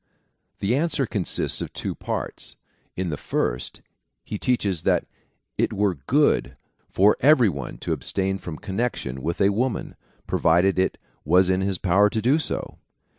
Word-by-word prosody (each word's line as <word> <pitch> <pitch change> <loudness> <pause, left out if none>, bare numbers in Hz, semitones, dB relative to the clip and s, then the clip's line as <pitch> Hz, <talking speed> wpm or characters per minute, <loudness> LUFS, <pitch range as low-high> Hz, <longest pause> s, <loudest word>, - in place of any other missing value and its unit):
The 105 +5 +1
answer 145 -2 +1
consists 100 -5 -1
of - - -5
two - - -3
parts. - - -5 0.4
In 95 -1 -2
the 75 - -3
first, 60 -2 -2 0.4
he 105 - -5
teaches 100 -9 0
that - - +1 0.5
it - - +2
were 100 -1 +1
good 125 - +1 0.3
for 100 +3 +4
every 130 -5 +5
one 70 -7 -6
to - - -2
abstain 95 0 -1
from 80 -4 -7
connection 100 - -3
with 85 +4 -3
a 100 - +4
woman, 115 +4 -2 0.3
provided 90 +3 +2
it 95 - +1 0.3
was 90 +4 +4
in 95 0 +1
his 95 -1 0
power 100 +4 +3
to 110 - -2
do 130 +8 +3
so. - - -3
95 Hz, 155 wpm, -24 LUFS, 90-115 Hz, 0.5 s, every